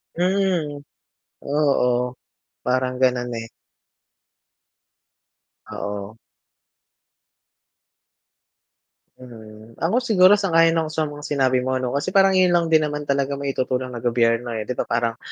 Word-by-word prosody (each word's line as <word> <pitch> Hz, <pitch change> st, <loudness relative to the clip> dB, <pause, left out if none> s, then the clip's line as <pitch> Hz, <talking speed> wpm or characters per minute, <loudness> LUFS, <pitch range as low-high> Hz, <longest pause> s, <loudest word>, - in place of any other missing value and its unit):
Mhm. 180 Hz, -5 st, 0 dB, 0.6 s
Oo, 125 Hz, -4 st, +1 dB, 0.5 s
parang 130 Hz, 0 st, 0 dB
gano'n, 125 Hz, -1 st, +1 dB
eh. 115 Hz, -, -9 dB, 2.2 s
Oo. 100 Hz, +1 st, -6 dB, 3.0 s
Mm, 110 Hz, -2 st, -13 dB
ako 175 Hz, +9 st, +1 dB
siguro 205 Hz, -5 st, +5 dB
sa 195 Hz, -4 st, -2 dB
kaya 165 Hz, 0 st, +6 dB
ng 160 Hz, -1 st, -1 dB
sumang 145 Hz, -2 st, -3 dB
sinabi 130 Hz, -3 st, +1 dB
mo 130 Hz, -, -1 dB
ano 125 Hz, -, -2 dB
kasi 145 Hz, +8 st, -2 dB
parang 195 Hz, -1 st, +4 dB
yun 180 Hz, -1 st, +4 dB
lang 170 Hz, -1 st, +2 dB
din 160 Hz, -1 st, +4 dB
naman 150 Hz, 0 st, -4 dB
talaga 140 Hz, -1 st, -1 dB
maitutulong 130 Hz, -2 st, -2 dB
ng 120 Hz, -1 st, -8 dB
gobyerno, 120 Hz, 0 st, +1 dB
eh, 110 Hz, -, -3 dB
dito 120 Hz, +4 st, -3 dB
parang 115 Hz, -1 st, -1 dB
140 Hz, 115 wpm, -22 LUFS, 120-165 Hz, 3.0 s, kaya